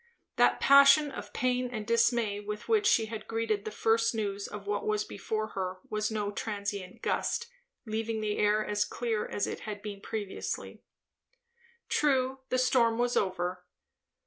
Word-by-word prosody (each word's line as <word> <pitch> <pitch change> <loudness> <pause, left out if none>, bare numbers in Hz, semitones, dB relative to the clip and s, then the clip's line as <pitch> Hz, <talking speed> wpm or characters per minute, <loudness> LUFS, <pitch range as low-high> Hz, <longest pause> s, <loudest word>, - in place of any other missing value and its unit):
That - - +4
passion 280 +1 +7
of - - -8
pain 250 0 0
and 215 -3 -4
dismay 230 -2 +2
with 210 +1 -6
which 430 -2 +3
she 225 - +4
had 220 -1 -7
greeted 225 -2 -1
the - - -2
first 225 +2 +1
news 200 -2 -2
of 205 -1 -8
what 205 0 -2
was 210 0 +1
before 215 +2 -3
her 185 -1 -3
was 215 0 0
no 210 -2 -2
transient 200 -3 -5
gust, 470 - 0 0.4
leaving 220 0 -2
the 210 -1 -2
air 210 +1 +3
as 205 0 +1
clear 225 -1 -2
as 205 - -1
it - - -5
had 210 -2 -7
been 205 -2 -6
previously. 205 -3 -5 1.1
True, 265 -2 +1
the 255 - +1
storm 245 -3 +3
was 245 0 +1
over. 180 -1 -1
215 Hz, 160 wpm, -30 LUFS, 205-235 Hz, 1.1 s, passion